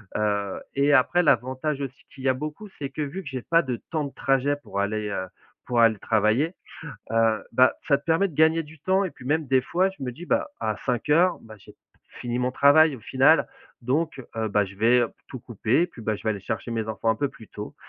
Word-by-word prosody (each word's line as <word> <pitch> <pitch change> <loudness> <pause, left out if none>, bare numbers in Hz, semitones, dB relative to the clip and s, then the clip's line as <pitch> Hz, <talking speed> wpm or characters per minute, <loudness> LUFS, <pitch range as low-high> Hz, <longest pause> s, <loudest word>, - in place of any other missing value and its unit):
heu 100 -2 -1
et 140 +1 +3
après, 160 +6 +4
l'avantage 130 +2 +1
aussi 135 0 -7
qu'il 130 - -11
y 135 - +2
a - - +4
beaucoup, 150 +10 -7
c'est 140 - -4
que, 140 - -6
vu 155 +7 -4
que 140 - -7
j'ai 130 -2 -5
pas 165 +5 +3
de 130 -5 -3 0.2
temps 155 -3 -1
de 140 - -8
trajet 135 +1 +1
pour 100 - -5
aller, 105 +1 -1
heu, 95 - -3 0.4
pour 120 -1 +2
aller 115 -2 +5
travailler, 110 - +1 0.6
heu, 115 -2 +2
bah, 130 +2 +5
ça 140 -2 +4
te - - -24
permet 170 +5 +2
de 160 - -13
gagner 160 +2 +4
du 155 +1 -15
temps 190 +6 +1
et 185 - -3
puis, 125 - -15
même, 150 +2 0
des 130 0 +3
fois, 180 +6 +1
je 190 -7 -13
me 125 - -4
dis: 170 +7 -10
«Bah 290 - +1
à - - -1
17:00 150 +9 +2
bah, 110 -1 -13
j'ai - - -16 0.5
fini 120 0 -3
mon 125 0 0
travail, 145 +2 +5
au - - -14
final. 135 +8 +4 0.4
Donc, 140 +2 -1
heu, 110 -1 -1
bah, 105 0 +2
je 95 0 -11
vais 120 +3 +4 0.2
tout 130 - -7
couper. 120 - 0
Puis, 155 - -14
bah, 110 -1 -1
je - - -14
vais 110 - 0
aller 100 - -3
chercher 115 - -4
mes 110 -1 -2
enfants 110 +1 0
un - - +2
peu 140 - 0
plus 110 -4 -15
tôt 105 0 -8
130 Hz, 240 wpm, -25 LUFS, 115-155 Hz, 0.6 s, aller